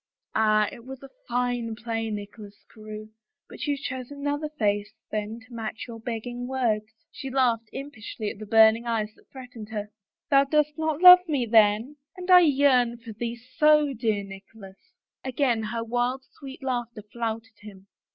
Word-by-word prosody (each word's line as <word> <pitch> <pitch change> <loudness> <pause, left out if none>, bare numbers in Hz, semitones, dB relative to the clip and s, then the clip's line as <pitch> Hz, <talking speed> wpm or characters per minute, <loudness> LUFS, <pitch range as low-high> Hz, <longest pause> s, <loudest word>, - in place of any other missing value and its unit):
Ah, 215 -1 +3
it 235 - -12
was 265 +1 -10 0.2
fine 245 -2 -1
play, 225 0 -3
Nicholas 205 0 -8
Carewe 215 -1 -9 0.2
— - - -61
but - - -7
you 290 -1 0
chose 260 -2 -5
another 290 +1 -3
face 205 -2 0 0.2
then 215 +2 -3
to 240 +2 -17
match 225 -1 -5
your 230 -1 -8
begging 245 +2 -5
words." 235 -5 0 0.2
She 275 -2 -7
laughed 240 -4 +1
impishly 225 -6 -6
at - - -12
the 215 - -8
burning 225 +2 +5
eyes 215 -2 -1
that - - -26
threatened 250 -5 -10
her. 210 -1 -5 0.2
" - - -67
Thou 275 0 +6
dost 300 +1 +1
not 315 0 -2
love 360 0 +12
me, 285 -6 0
then? 220 +5 +3 0.2
And 365 0 -3
I 360 - +10
yearn 265 -6 +3
for 230 -1 -10
thee 235 +2 -4 0.2
so, 300 -2 +5
dear 220 -4 -1
Nicholas! 195 0 -12 0.2
" - - -67
Again 255 -3 0
her 230 +1 -3
wild, 245 +3 -1 0.2
sweet 270 0 -10
laughter 240 -4 -3
flouted 225 0 -5
him. 195 -2 -13
235 Hz, 170 wpm, -26 LUFS, 215-265 Hz, 0.2 s, love